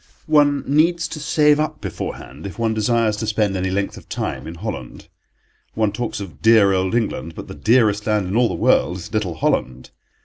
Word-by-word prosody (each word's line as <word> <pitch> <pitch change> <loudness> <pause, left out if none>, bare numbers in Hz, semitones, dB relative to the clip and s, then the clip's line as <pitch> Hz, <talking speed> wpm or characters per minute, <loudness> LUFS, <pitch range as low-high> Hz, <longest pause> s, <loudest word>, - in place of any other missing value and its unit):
One 145 -3 +3
needs 165 +4 +2
to 155 - -6
save 150 0 +3
up 155 0 -2
beforehand 70 +8 -6
if 95 - -9
one 115 -1 0
desires 110 0 +1
to 110 - -3
spend 105 -2 0
any 95 0 -1
length 100 +1 -2
of - - -14
time - - -4
in 80 - -7
Holland. 65 -6 -7 0.7
One 110 -2 +1
talks 115 +1 -4
of 95 -4 -9
dear 110 -3 +5
old 95 +2 0
England, 100 -8 -2
but - - -8
the - - -8
dearest 110 -3 +2
land 105 -2 +1
in 95 +3 -3
all 120 0 +4
the - - -3
world 85 +5 +2
is 90 0 -10
little 100 -6 -1
Holland. 65 -5 -1
105 Hz, 200 wpm, -20 LUFS, 95-120 Hz, 0.7 s, dear